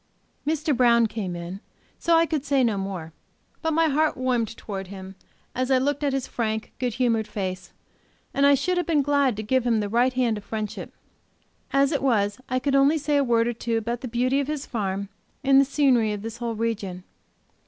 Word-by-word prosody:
Mr. 310 -1 +1
Brown 235 -1 +5
came 210 -5 -4
in, 175 +3 -6 0.4
so 335 -1 +3
I 330 0 +5
could 305 -3 -2
say 280 -2 +2
no 225 -3 +2
more. 190 -5 -5 0.5
But 320 - 0
my 325 +1 +3
heart 310 +1 +1
warmed 245 -4 -1
towards 195 -3 -6
him, 190 -1 -9 0.4
as 255 +1 -1
I 265 - +5
looked 285 +3 0
at 285 - +2
his 270 -1 -1
frank 220 -2 -3
good 245 -3 -1
humored 230 -4 +1
face, 190 -3 -5 0.6
and 275 - +1
I 280 0 +7
should 360 +7 0
have 355 - -1
been 305 -4 +2
glad 280 -5 +2
to 215 - -3
give 260 +4 +1
him 235 -2 +2
the 205 -1 -2
right 245 +4 +2
hand 240 -4 +1
of - - -15
fellowship, 215 0 -5 0.8
As 275 0 +3
it 285 - 0
was 210 -5 +1
I 255 - +1
could 275 +2 -1
only 275 +3 +4
say 295 -1 0
a 285 - +3
word 235 -2 +2
or 240 - 0
two 230 0 -2
about 235 +2 -3
the 255 - -4
beauty 250 +3 +1
of 280 - -1
his 300 -2 -3
farm, 200 -3 -3 0.3
and 270 0 +6
the - - +2
scenery 260 -6 +2
of 205 0 -6
this 225 +1 -6
whole 235 -1 -3
region. 205 -5 -3
240 Hz, 215 wpm, -25 LUFS, 215-275 Hz, 0.8 s, I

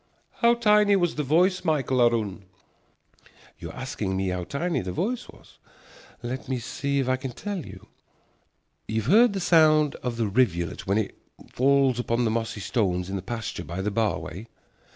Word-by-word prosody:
"How 235 0 +4
tiny 210 -3 +4
was 175 -3 +1
the 150 - -2
voice, 175 +6 +2
Michael 135 -6 +1
aroon?" 110 -5 +1 1.1
You - - -7
are - - -10
asking 110 -7 -3
me 95 0 -1
how 90 -1 -3
tiny 170 - -2
was - - -6
the - - -2
voice? 225 - -2 1.0
Let 130 +2 -5
me 130 - 0
see 140 +4 -3
if 135 -2 0
I 130 0 +2
can 130 -1 -6
tell 200 - -5
you. 95 -4 -12 1.0
You 110 0 -1
have 130 - 0
heard 225 +1 +6
the 195 - -2
sound 155 -4 +4
of 125 -2 -4
the 115 - +1
rivulet 95 -8 0
when 100 +2 +2
it 110 - -2 0.4
falls 135 -1 +3
upon 120 0 0
the 110 - +1
mossy 110 -2 -3
stones 95 -3 -1
in - - -3
the 95 - -3
pasture 115 +4 -5
by 85 +5 -5
the 105 - -1
bar 110 -1 +1
way? 95 +8 -8
125 Hz, 185 wpm, -25 LUFS, 105-155 Hz, 1.1 s, heard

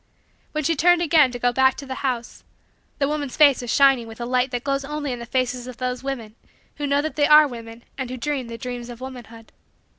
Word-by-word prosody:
When 305 0 -1
she 330 +4 +1
turned 350 +3 +4
again 300 -5 +4
to 245 - -5
go 245 0 +1
back 265 +1 +3
to 280 - -8
the 265 - -5
house, 250 -4 -3 0.5
the 275 - +1
woman's 290 -3 -3
face 285 -4 +6
was 245 - -4
shining 270 -4 +4
with 225 0 -10
the 240 - -5
light 250 +1 +1
that 245 -1 -4
glows 275 0 -1
only 295 0 -4
in 245 - -4
the 235 - -8
faces 250 -1 -1
of 250 -2 -9
those 250 0 -3
women 245 -6 -5 0.4
who 290 -1 -2
know 280 +1 +2
that 315 - -4
they 290 -1 +3
are 300 0 +8
women 230 -2 -10 0.2
and 260 -2 -3
who 255 - -5
dream 275 -1 -3
the 230 0 -7
dreams 245 0 -6
of 240 -1 -9
womanhood. 240 -3 -10
260 Hz, 240 wpm, -23 LUFS, 245-285 Hz, 0.5 s, are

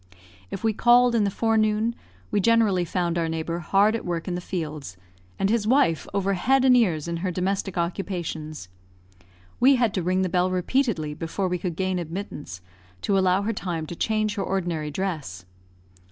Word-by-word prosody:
If 190 - -6
we 220 -1 +2
called 240 +2 +5
in 220 -3 +3
the - - +1
forenoon, 220 +1 +1 0.4
we 205 - +2
generally 210 -4 +3
found 175 0 -1
our 165 -1 0
neighbour 165 +1 -3
hard 200 +5 +3
at 230 - -4
work 170 -2 -3
in 180 - -2
the 175 - -3
fields, 150 - -5 0.4
and 195 - +1
his 215 0 +1
wife 235 - +3
over 195 0 0
head 260 +8 +2
and 255 -1 +6
ears 170 -10 +2
in 170 0 -2
her 185 +2 -2
domestic 190 +1 -2
occupations. 170 - -3 0.9
We 270 +2 +6
had 235 -5 +1
to 185 - -1
ring 185 +2 +1
the - - +1
bell 180 +1 +1
repeatedly 185 - 0
before 165 +5 -3
we 180 0 -2
could 175 -2 -3
gain 185 0 -1
admittance, 165 - -6 0.4
to 200 - +1
allow 190 0 +3
her 225 +2 -1
time 175 -6 -3
to 170 - -7
change 215 +2 0
her 200 -2 -2
ordinary 170 -5 -2
dress. 150 - -4
185 Hz, 180 wpm, -25 LUFS, 170-215 Hz, 0.9 s, and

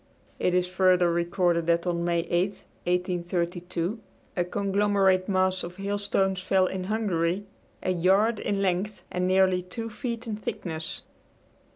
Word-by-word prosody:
It 180 - +2
is 180 0 +3
further 180 -1 +3
recorded 170 0 +1
that 170 0 +2
on 170 -1 0
May 170 -1 +1
8, 175 +3 +1 0.4
1832, 175 +1 -1 0.4
a 175 - +2
conglomerate 195 0 +2
mass 185 -1 +2
of 175 +1 -7
hailstones 195 -1 0
fell 190 0 +3
in 185 0 -3
Hungary 195 -3 0 0.4
a 185 - +1
yard 195 +5 +3
in 200 -1 -1
length 190 +3 -1
and 180 0 0
nearly 185 -1 +4
two 225 +6 -6
feet 235 0 -4
in 215 -2 -3
thickness. 160 -6 -4
185 Hz, 140 wpm, -27 LUFS, 175-200 Hz, 0.4 s, nearly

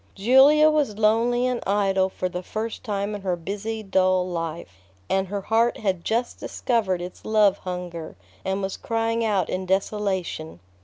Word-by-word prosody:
Julia 275 +8 +6
was 285 -9 0
lonely 230 +3 +2
and 250 -1 -1
idle 195 -1 +2
for 185 - -3
the 180 0 -5
first 220 +4 -5
time 205 -2 -2
in 205 - -5
her 185 -2 -1
busy, 205 +5 -5
dull 185 -2 +2
life, 165 - -5 0.3
and 190 0 +1
her 200 +1 -3
heart 230 +4 +2
had 190 -5 -1
just 235 +2 -1
discovered 195 -8 -1
its 180 - -9
love 210 -2 +3
hunger, 180 - -6 0.3
and 190 +1 -2
was 195 - -3
crying 230 0 -1
out 200 -6 +1
in 185 0 -3
desolation. 190 - -2
200 Hz, 160 wpm, -24 LUFS, 185-225 Hz, 0.3 s, Julia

